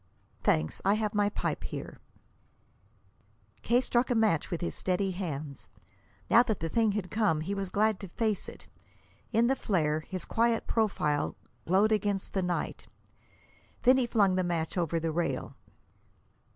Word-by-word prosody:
"Thanks; 80 0 +1
I 200 +2 +4
have 215 -1 -1
my 205 -1 +2
pipe - - -3
here." - - -6 1.6
K. 240 +1 +3
struck 245 0 +1
a 245 - +2
match 215 -9 +2
with 170 - -2
his 175 - -3
steady 190 +1 0
hands. 155 -7 -5 0.6
Now 235 - +7
that 225 -5 -1
the 165 - -2
thing 220 +2 +2
had 200 -3 -3
come, 205 -8 +1
he 185 +6 -3
was 195 -2 -3
glad 215 +1 +1
to 195 - -7
face 215 +2 -1
it. - - -13 0.6
In 230 +1 +3
the 265 +3 +3
flare, 155 - 0
his 185 +3 -5
quiet 230 0 +1
profile 155 -10 0 0.3
glowed 195 +5 +4
against 205 -2 0
the 190 - +1
night. 180 -1 -3 1.0
Then 255 +1 +6
he 255 -2 +1
flung 200 -5 +3
the 185 0 +1
match 170 -2 -2
over 170 -2 0
the 165 0 -1
rail. 170 +2 -2
195 Hz, 160 wpm, -29 LUFS, 170-220 Hz, 1.6 s, Now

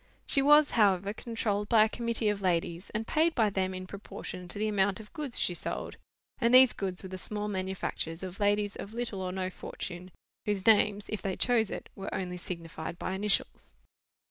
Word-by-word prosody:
She 275 - +4
was, 295 +1 +6
however, 200 -2 +3
controlled 215 -3 -2
by 220 -2 +7
a - - +3
committee 235 -1 -1
of 205 -1 -1
ladies; 175 -1 -1
and 220 +1 -3
paid 320 +6 +2
by 220 -4 +3
them 190 -1 0
in 185 0 -6
proportion 185 -2 -8
to 175 - -5
the 215 +1 0
amount 200 -2 +1
of 215 -1 -12
goods 295 -6 -2
she 180 - +2
sold; - - -5 0.4
and 235 -2 +3
these 255 -1 +8
goods 190 -2 -3
were 190 - -7
the 185 0 -6
small 210 +1 -3
manufactures 185 -3 -3
of 185 +1 -7
ladies 205 0 +1
of 210 +3 -8
little 235 -5 -2
or 185 -1 -2
no 185 0 -3
fortune, 180 0 -7 0.4
whose 205 -2 -1
names, 210 -2 +4
if 215 - -4
they 190 -2 -2
chose 230 -4 +2
it, - - -6
were 195 - -6
only 180 -1 -3
signified 170 -2 -6
by 185 - -3
initials. 200 +1 -1
200 Hz, 195 wpm, -30 LUFS, 185-220 Hz, 0.4 s, these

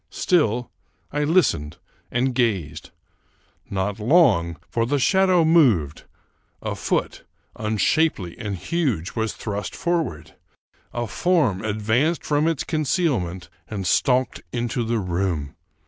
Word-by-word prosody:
Still 125 - +1 0.4
I 150 +1 0
listened 145 - +1 0.3
and 125 +2 0
gazed. 95 - -1 0.8
Not 100 +2 -2
long, 105 - +3
for 115 -1 -1
the 145 +3 +1
shadow 185 +3 +3
moved; 120 - +3 0.5
a - - -3
foot, - - -2 0.3
unshapely 110 - 0
and 100 -2 -3
huge, 120 - -1
was 110 -1 -2
thrust 105 -1 -5
forward; 165 - -2 0.6
a 120 0 -2
form 125 - +1
advanced 110 +10 0
from 150 +1 +2
its 165 -4 0
concealment, 135 - -1 0.2
and 100 -3 -5
stalked 125 +5 +1
into 120 0 -2
the 115 +1 -1
room. 90 -6 -2
115 Hz, 115 wpm, -23 LUFS, 95-155 Hz, 0.8 s, long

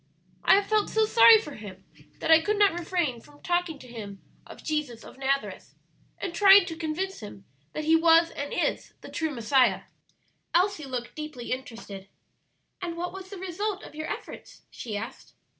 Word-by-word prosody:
"I - - +6
have 400 0 +2
felt 430 0 +1
so 440 0 +2
sorry 455 0 +8
for 300 -9 -6
him 195 -4 -10 0.4
that - - +1
I 320 0 +8
could 420 +5 0
not 405 -3 +4
refrain 335 -8 -2
from 290 +3 -19
talking 350 -3 -1
to 255 - -14
him 205 -5 -9 0.3
of - - -12
Jesus 300 -7 -3
of - - -14
Nazareth, 275 +1 -2 0.4
and 375 -4 -5
trying 395 0 +7
to 330 - -6
convince 340 +4 -3
him 200 -2 -11 0.3
that 305 - -4
He 320 +1 +4
was 330 0 +5
and 285 0 -5
is - - -2
the - - -10
true 320 -1 -2
Messiah." 255 0 +2 0.7
Elsie 365 -3 +2
looked 250 -3 -5
deeply 305 -6 -7
interested. 225 -6 -6 0.7
"And 340 -2 -4
what 355 +1 -4
was 380 -1 -9
the 400 - -8
result 380 +2 -4
of - - -11
your 310 +1 -5
efforts?" - - -9
she 215 -4 -6
asked. 225 +5 -9
320 Hz, 180 wpm, -27 LUFS, 255-370 Hz, 0.7 s, sorry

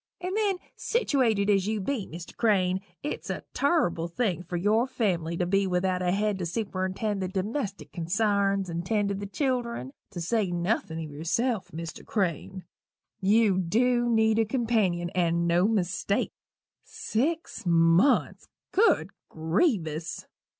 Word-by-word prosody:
And 365 +2 -3
then, 415 -3 +1 0.2
sittiwated 250 - +1
as 200 -2 +3
you 215 0 0
be, 215 +1 -2
Mr. 170 +1 -9
Crane, 190 -4 +2 0.2
it's 295 - -4
a - - -3
turrible 275 - +1
thing 180 0 -1
for 175 0 -4
your 215 +7 +2
family 170 -9 -1
to 180 - 0
be 195 +2 +2
without 180 0 0
a 180 -1 +1
head 205 0 0
to 180 - -2
superintend 195 +1 -2
the 185 - -1
domestic 200 +3 -3
consarns 195 +2 +1
and 170 0 -3
tend 205 +1 0
to - - 0
the 200 +1 -5
children 235 - -2 0.2
to - - -7
say 195 +3 0
nothin' 175 -1 -1
o' - - -3
yerself, 175 - -1
Mr. 165 0 -7
Crane. 185 -1 -2 0.6
You 205 -1 +3
dew 240 +7 +2
need 220 -1 +3
a 225 - +3
companion, 215 -8 0
and 170 -2 +1
no 175 +3 +3
mistake. 200 -1 0 0.5
Six 330 - -2
months! 170 +9 +3 0.2
Good 450 +4 +3 0.2
grievous! 160 - -1
195 Hz, 145 wpm, -27 LUFS, 175-225 Hz, 0.6 s, as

